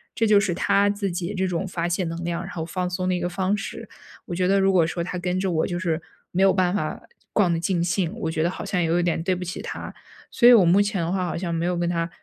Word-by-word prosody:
这 225 - +1
就 210 -1 +6
是 200 -3 0
他 200 +2 +3
自 200 -1 -2
己 175 +2 -3
这 190 0 0
种 180 +1 -2
发 175 -2 -2
泄 175 +2 0
能 165 +1 -4
量， 170 0 -2
然 185 - -8
后 160 -2 -4
放 180 +2 -3
松 185 0 -2
的 - - +2
一 - - -2
个 175 - -1
方 190 +3 0
式。 200 - -7 0.4
我 - - -6
觉 180 +1 +1
得 195 +1 +3
如 195 0 +4
果 175 -3 +4
说 170 0 -3
他 180 +1 -4
跟 180 +1 -1
着 190 -1 0
我 160 -2 +1
就 175 - -3
是 170 -3 -1 0.3
没 180 - 0
有 195 - +5
办 185 -1 +1
法 205 - -2 0.3
逛 195 -5 +3
得 165 - 0
尽 170 0 0
兴， 175 -1 0
我 160 - -2
觉 155 - -1
得 170 - +2
好 185 - -6
像 195 - -1
也 165 - +1
有 170 +2 +2
点 170 -2 0
对 185 +1 +1
不 180 - -5
起 180 - -5
他。 - - -6 0.4
所 240 - +5
以 245 - +10
我 220 -5 +7
目 180 +4 +5
前 205 -2 -1
的 165 - -2
话 185 -1 0
好 170 - -3
像 170 -1 -3
没 165 +1 -1
有 180 0 0
跟 175 0 0
他 170 -1 -1
180 Hz, 325 characters per minute, -24 LUFS, 170-190 Hz, 0.4 s, 以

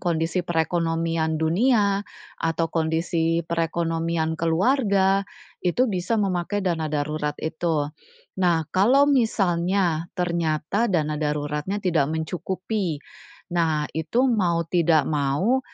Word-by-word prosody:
kondisi 165 +1 0
perekonomian 165 -1 0
dunia 200 +5 +2 0.4
atau 165 0 0
kondisi 165 0 0
perekonomian 165 -1 -1
keluarga, 195 - +2 0.4
itu 180 +8 +2
bisa 200 -1 -1
memakai 195 0 -1
dana 165 -4 -1
darurat 150 0 -2
itu. 160 -1 -1 0.6
Nah, 170 -3 +2
kalau 245 +9 +5
misalnya, 185 - +1
ternyata 170 +4 0
dana 155 -5 0
daruratnya 150 +4 -2
tidak 160 -6 +2
mencukupi, 180 +3 -3 0.6
nah, 160 -3 +1
itu 165 - 0
mau 180 -9 +1
tidak 165 -2 +2
mau 150 - +1
170 Hz, 100 wpm, -24 LUFS, 160-190 Hz, 0.6 s, kalau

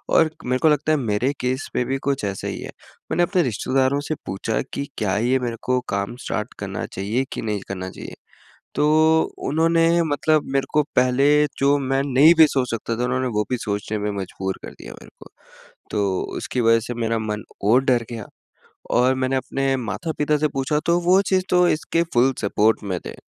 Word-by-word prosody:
और 160 -1 +5 0.2
मेरे 130 +1 0
को 160 - +5
लगता 150 +1 +1
है 155 - +3
मेरे 120 +1 0
केस 130 +3 -2
में 125 - +1
भी 135 - -1
कुछ 135 -5 -1
ऐसा 100 -1 -4
ही - - -4
है। - - -7 0.4
मैंने 175 +2 +2
अपने 180 +1 +2
रिश्तेदारों 130 +3 0
से 155 - -1
पूछा 100 +3 -2
कि 140 - -3
क्या 105 -2 0
ये 125 +4 +2
मेरे 120 -2 -3
को 125 0 +1
काम 100 +4 -2
स्टार्ट 110 +2 -3
करना 100 -1 -4
चाहिए 105 +8 -2
कि - - -4
नहीं 105 -3 -2
करना 95 -1 -5
चाहिए? - - -9 0.6
तो 155 +2 +4 0.3
उन्होंने 165 +3 +3
मतलब 155 0 +1
मेरे 135 -1 +1
को 150 0 +4
पहले 125 +2 +3 0.3
जो 140 +1 +3
मैं 135 0 0
नहीं 150 +6 +7
भी 160 - +8
सोच 130 -4 -1
सकता 115 0 -3
था, 120 - -1
उन्होंने 130 +1 0
वो 105 -3 0
भी 125 - 0
सोचने 105 0 -3
में 105 0 -2
मजबूर 95 0 -4
कर - - -7
दिया - - -11
मेरे - - -14
को, - - -14 0.6
तो 100 -3 0 0.2
उसकी 125 - -2
वजह 115 0 +4
से 120 +2 -5
मेरा 115 -1 -1
मन 105 -1 -4 0.2
और 120 +6 +4
डर 120 -3 +2
गया। 115 -3 -6 0.7
और 125 +2 +3
मैंने 130 0 0
अपने 135 +1 -1
माता-पिता 150 - -1
से 155 - +1
पूछा, 135 +3 0
तो 170 +1 +3
वो 185 +3 +4
चीज़ 185 -1 +2
तो 180 -1 +4
इसके 165 +2 0
फुल 130 +2 +4
सपोर्ट 105 +2 +1
में 95 -3 -3
थे, - - -6
130 Hz, 200 wpm, -22 LUFS, 110-150 Hz, 0.7 s, भी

